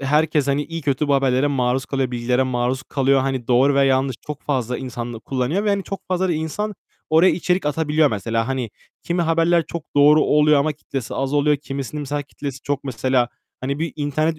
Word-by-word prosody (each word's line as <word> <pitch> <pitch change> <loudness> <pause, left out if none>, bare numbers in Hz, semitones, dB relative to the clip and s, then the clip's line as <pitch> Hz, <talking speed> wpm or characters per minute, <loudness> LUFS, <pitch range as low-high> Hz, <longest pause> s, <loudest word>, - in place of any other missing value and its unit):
herkes, 150 +1 +2
hani, 140 +1 +1
iyi 165 +1 -6
kötü 140 +1 0
bu 140 - +4
haberlere 135 0 +2
maruz 130 -2 0
kalıyor, 135 -2 -1
bilgilere 125 +1 +1
maruz 130 0 -1
kalıyor. 135 -1 +2
Hani, 130 -3 -2
doğru 130 +3 +4
ve 140 0 +4
yanlış 130 -1 +1
çok 150 -1 -6
fazla 125 -4 -1
insan 120 -2 -5
da - - -6
kullanıyor 135 - -1
ve - - +1
hani, 200 -1 0
çok 195 +1 -6
fazla 185 0 0
da - - +1
insan 165 +7 -3 0.4
oraya 165 +4 +6
içerik 180 +1 0
atabiliyor 150 0 +2
mesela. 115 +3 -1
Hani, 130 -4 -2 0.3
kimi 175 0 0
haberler 165 +1 +2
çok 170 - -5
doğru 150 +2 +6
oluyor 150 0 +4
ama 155 +2 +1
kitlesi 135 -4 -6
az 135 0 -2
oluyor. 145 0 +3
Kimisinin 140 +1 -5
mesela 145 0 -3
kitlesi 140 -1 -7
çok, 140 -1 -2
mesela. 130 -1 +1 0.3
Hani, 140 +2 -2
bir 165 +1 -2
internet 155 +2 -1
140 Hz, 200 wpm, -21 LUFS, 130-155 Hz, 0.4 s, oraya